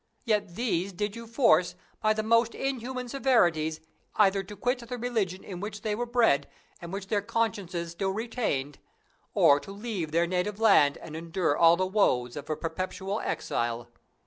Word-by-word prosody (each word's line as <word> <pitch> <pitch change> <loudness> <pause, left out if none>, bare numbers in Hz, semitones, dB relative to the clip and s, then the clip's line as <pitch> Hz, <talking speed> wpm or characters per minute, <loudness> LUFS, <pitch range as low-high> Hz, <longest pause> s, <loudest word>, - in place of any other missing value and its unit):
Yet 210 -6 0
these 195 -5 -1
did 205 +3 -3
you 230 0 -8
force, 220 - +3 0.3
by 215 -1 +3
the 215 0 -2
most 230 +1 +3
inhuman 255 -1 -3
severities, 175 - +2 0.3
either 195 -2 +4
to 200 +2 -10
quit 250 +4 0
the 245 +1 -6
religion 220 -7 -2
in 180 -3 -7
which 205 +1 -6
they 215 - 0
were 240 +3 -2
bred, 225 - +3 0.3
and 170 0 -8
which 195 0 -4
their 205 +1 0
consciences 195 -6 -2
still 190 +3 -2
retained, 195 - -2 0.6
or 140 0 +6
to 195 - -10
leave 200 -6 -4
their 170 +2 +3
native 185 +4 -2
land, 145 -10 +5
and 155 - -9
endure 165 -1 -1
all 165 +1 +6
the 185 - +1
woes 130 - +1
of 145 0 -8
a 155 - 0
perpetual 185 +5 -3
exile. 120 0 -2
195 Hz, 170 wpm, -28 LUFS, 170-230 Hz, 0.6 s, or